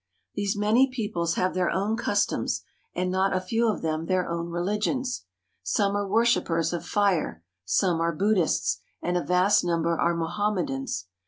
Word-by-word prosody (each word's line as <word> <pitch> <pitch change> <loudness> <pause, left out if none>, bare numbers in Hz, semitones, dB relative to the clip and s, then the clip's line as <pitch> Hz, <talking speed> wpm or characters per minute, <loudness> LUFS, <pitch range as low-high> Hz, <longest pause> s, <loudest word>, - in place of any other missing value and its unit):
These 205 0 -1
many 220 +6 +4
peoples 205 -9 -2
have 185 0 0
their 185 -1 +1
own 200 +4 0
customs, 205 -3 0 0.3
and 180 0 -1
not 190 +1 +1
a - - +1
few 225 +6 0
of 215 - -1
them 160 0 -2
their 185 -1 +1
own 170 0 -3
religions. 210 - -1 0.4
Some 200 - +1
are 205 -1 -1
worshipers 190 -7 +2
of 175 - -3
fire, 190 - 0 0.2
some 165 - +1
are 170 0 +2
Buddhists, 165 - +1 0.2
and 175 - 0
a 175 - +1
vast 180 +3 +3
number 170 -1 +1
are 170 0 +2
Mohamme 180 +3 -1
dans. 135 -9 -4
185 Hz, 165 wpm, -26 LUFS, 170-205 Hz, 0.4 s, many